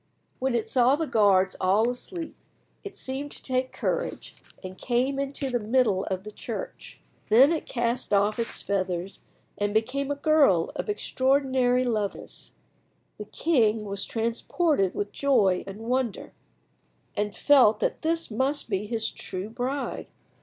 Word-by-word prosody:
When 260 -1 0
it 230 - -1
saw 255 +1 +4
the 320 +2 -2
guards 200 -7 +3
all 200 +5 +3
asleep 325 +7 -5 0.5
it 405 - -9
seemed 270 +2 -4
to - - -14
take 255 0 -1
courage, - - -3 0.3
and 185 0 -7
came 255 +5 0
into 275 -1 -3
the 245 - +1
middle 215 -3 +1
of 190 0 -3
the 210 - -8
church. - - -7 0.3
Then 255 +8 +7
it 325 - -2
cast 240 +1 -1
off 205 +2 +2
its 230 - -3
feathers 185 -1 -2 0.4
and 205 +1 -1
became 260 +6 0
a 285 - 0
girl 280 - +3
of - - -4
extraordinary 260 -8 +1
loveliness. 215 -5 -4 0.7
The 210 - -6
king 225 -5 +1
was 200 -1 -2
transported 230 - 0
with 205 0 -3
joy 215 -10 +2
and 195 +2 -8
wonder, 245 -1 -2 0.8
and 205 0 -2
felt 250 -7 +5
that - - -1
this 330 -3 -1
must 260 +2 -1
be 200 +1 -1
his 225 0 -1
true 190 +4 -6
bride. 260 +4 -3
240 Hz, 145 wpm, -26 LUFS, 205-275 Hz, 0.8 s, Then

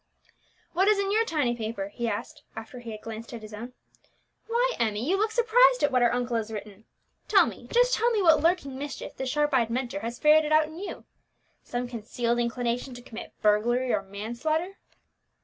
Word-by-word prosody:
"What 375 +3 +2
is 425 -1 +5
in 400 0 0
your 445 +2 +3
tiny 290 - 0
paper?" 220 -3 -4
he 235 +3 -3
asked, - - -5
after 225 +3 -8
he 240 -1 -9
had 215 -1 -7
glanced 225 +1 -8
at 225 - -9
his 215 0 -10
own. 235 +4 -7 0.7
"Why, 485 +2 +1
Emmie, 220 +1 0
you 370 - +3
look 430 +3 +1
surprised - - +4
at 290 - +3
what 255 -1 +3
our 240 - +4
uncle 245 -1 -1
has 225 0 -3
written. 210 0 -8 0.4
Tell - - +6
me, - - -8
just - - +4
tell 465 +2 +3
me 455 -3 +1
what 330 -6 +5
lurking 315 -6 +1
mischief 290 0 -6
the 265 - -4
sharp 295 +2 +1
eyed 235 -3 +3
Mentor 240 -3 -2
has 235 +3 -5
ferreted 305 +1 +4
out 310 0 +5
in 315 +2 -10
you. 400 - -7 0.6
Some 245 0 -4
concealed 235 0 -2
inclination 240 +1 -2
to 245 - -9
commit 230 -2 -9
burglary 240 +4 +2
or 210 - +1
manslaughter?" 240 - -3
250 Hz, 200 wpm, -27 LUFS, 230-330 Hz, 0.7 s, Tell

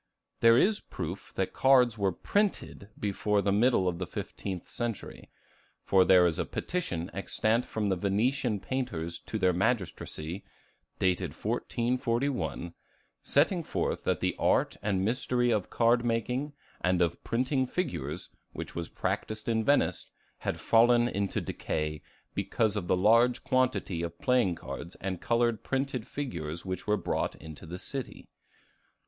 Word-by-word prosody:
There 115 0 +7
is 210 - +4
proof 90 +2 -6
that 95 - -1
cards 125 -3 +5
were 100 -3 +1
printed 200 - -1
before 105 0 +1
the 100 - +2
middle 105 -2 +3
of 85 -1 -1
the 95 - -3
fifteenth 95 0 -5
century; 120 -3 -5 0.5
for 95 -1 +5
there 90 -1 +6
is 85 -2 +1
a - - 0
petition 95 - -3
extant 110 +4 0
from 105 -2 -1
the 95 - +2
Venetian 105 +5 +1
painters 85 -11 -3
to 110 - -5
their 95 -3 +3
magistracy, 95 -4 -2 0.5
dated 90 -2 0
1441, 120 - -1 0.5
setting 170 +5 +2
forth - - -2
that - - +1
the - - 0
art - - +2
and 95 -2 0
mystery 120 +1 +1
of 105 -4 0
card 120 +1 +3
making 125 +5 -1 0.3
and 90 -1 +2
of 85 -1 0
printing 130 +2 0
figures, 180 0 -3 0.2
which - - -6
was 85 -1 -4
practiced 110 -1 -3
in 110 -1 +1
Venice, 145 +5 +2 0.3
had - - -3
fallen 120 +1 +5
into 100 -3 -1
decay, 75 -1 -3 0.3
because 110 -3 0
of 95 -4 -3
the 90 - +3
large 115 +5 +4
quantity 125 -9 +1
of 85 0 -4
playing 125 -8 +2
cards 80 +5 -7
and 95 -2 -4
colored 115 -1 +1
printed 135 -3 -2
figures 85 - -5
which 95 +2 -4
were 105 0 +3
brought 90 - -1
into 80 +1 -11
the 90 +2 -6
city. 135 +6 -6
110 Hz, 145 wpm, -29 LUFS, 90-125 Hz, 0.5 s, There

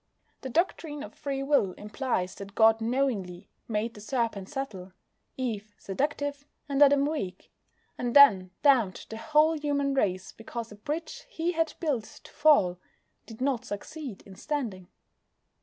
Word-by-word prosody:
The 265 - -5
doctrine 305 -1 -1
of - - -9
Free 275 -1 -3
Will 275 -10 +2
implies 210 -3 -2
that 200 0 -10
God 225 0 +5
knowingly 225 -7 -1 0.2
made 225 +1 -1
the 210 - -12
Serpent 220 -4 -2
subtle, 195 -10 -5 0.4
Eve 215 -5 -4
seductive, 285 +6 -2 0.2
and 280 -1 0
Adam 280 -1 +6
weak, 280 -12 -4 0.5
and 245 0 -2
then 200 -11 +8
damned 245 -10 +3
the 220 - -5
whole 310 +5 +3
human 285 -2 0
race 190 -8 0
because 225 0 -7
a - - -9
bridge 305 - -5
He 340 -7 -1
had 325 -2 0
built 280 -10 0 0.2
to - - -14
fall 190 - +4 0.5
did 225 +1 -11
not 260 -3 +1
succeed 255 +1 -7
in 195 - -13
standing. 215 -7 -4
250 Hz, 145 wpm, -28 LUFS, 205-285 Hz, 0.5 s, then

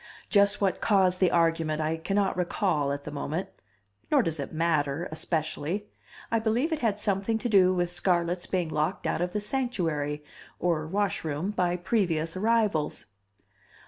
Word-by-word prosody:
Just 200 0 +4
what 195 -2 0
caused 185 -3 +3
the 185 - +4
argument 165 -2 +1
I 155 +1 0
cannot 195 +4 0
recall 175 -5 0
at 140 0 -4
the - - -7
moment. 155 +5 -3 0.6
Nor - - +4
does 165 -2 -2
it 140 - -4
matter 155 -1 0
especially. 160 +4 -2 0.5
I 230 - +3
believe 235 +8 0
it 310 - -1
had 215 -5 0
something 205 +1 0
to 235 - -3
do 190 -5 +5
with 175 -1 0
Scarlett's 175 0 0
being 180 -4 -1
locked 155 +5 -1
out - - 0
of 180 0 -1
the 210 - -1
Sanctuary, 170 - -1 0.4
or 165 -3 0
Washroom, 180 -2 -1
by 180 -3 0
previous 175 -4 0
arrivals. 210 -6 +1
180 Hz, 155 wpm, -28 LUFS, 160-200 Hz, 0.6 s, do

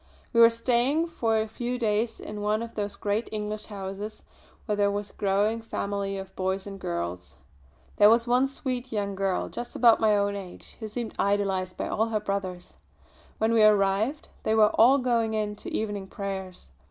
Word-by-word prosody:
We 235 - +5
were 230 - +10
staying 250 +7 +1
for 225 -9 0
a 220 - -1
few 240 +3 -3
days 225 0 0
in 210 0 -7
one 210 +2 0
of 230 - -8
those 205 -1 -3
great 210 +3 -2
English 210 0 -4
houses 200 +1 -6 0.4
where 210 - 0
there 205 0 +2
was 205 0 -3
a - - -29
growing 205 +3 +1
family 200 -3 -3
of 190 0 -8
boys 190 +1 -1
and 195 -1 -8
girls. 85 - -4 0.6
There 205 0 +8
was 230 +1 +4
one 250 +2 +3
sweet 260 -2 -4
young 205 -2 -2
girl, 195 -1 -1
just 240 0 -7
about 230 -2 +6
my 215 -1 +4
own 200 0 0
age, 190 -3 -9
who 220 - -5
seemed 225 +1 -5
idolised 195 -2 0
by - - -2
all 220 +2 0
her 220 -1 0
brothers. 195 -3 -4 0.6
When 220 +1 +1
we 225 - +4
arrived 210 +6 +3
they 220 - +1
were 215 -1 +5
all 250 +6 +6
going 235 -4 +1
in 210 -1 -1
to - - -8
evening 205 -3 -3
prayers. 190 - -6
210 Hz, 190 wpm, -27 LUFS, 195-230 Hz, 0.6 s, were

